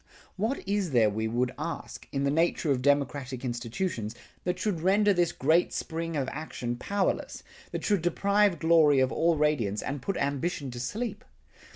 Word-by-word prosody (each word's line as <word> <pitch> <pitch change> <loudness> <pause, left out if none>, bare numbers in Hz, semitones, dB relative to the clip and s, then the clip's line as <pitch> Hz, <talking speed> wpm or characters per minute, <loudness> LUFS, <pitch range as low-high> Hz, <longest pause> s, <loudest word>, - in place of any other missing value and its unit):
What 220 +2 -2
is 200 -6 0
there 110 -3 +4
we 110 +2 -1
would 125 +3 0
ask, - - -5
in 135 - -1
the 140 - +2
nature 165 0 +1
of 130 -2 +1
democratic 140 -2 0
institutions, 120 - -3 0.3
that 180 0 0
should 185 -4 -1
render 200 +3 +4
this 175 -2 +2
great 160 +6 +2
spring 165 0 -3
of 135 -2 -1
action 125 -5 -4
powerless, 200 +9 -2 0.3
that - - -5
should 205 -4 +2
deprive 200 +2 +2
glory 160 -3 +5
of 130 0 +2
all 165 -1 +2
radiance, 130 -10 +1
and 140 0 -4
put 195 +8 -2
ambition 140 0 -2
to 120 - -7
sleep? 210 - -4
150 Hz, 170 wpm, -28 LUFS, 130-180 Hz, 0.3 s, glory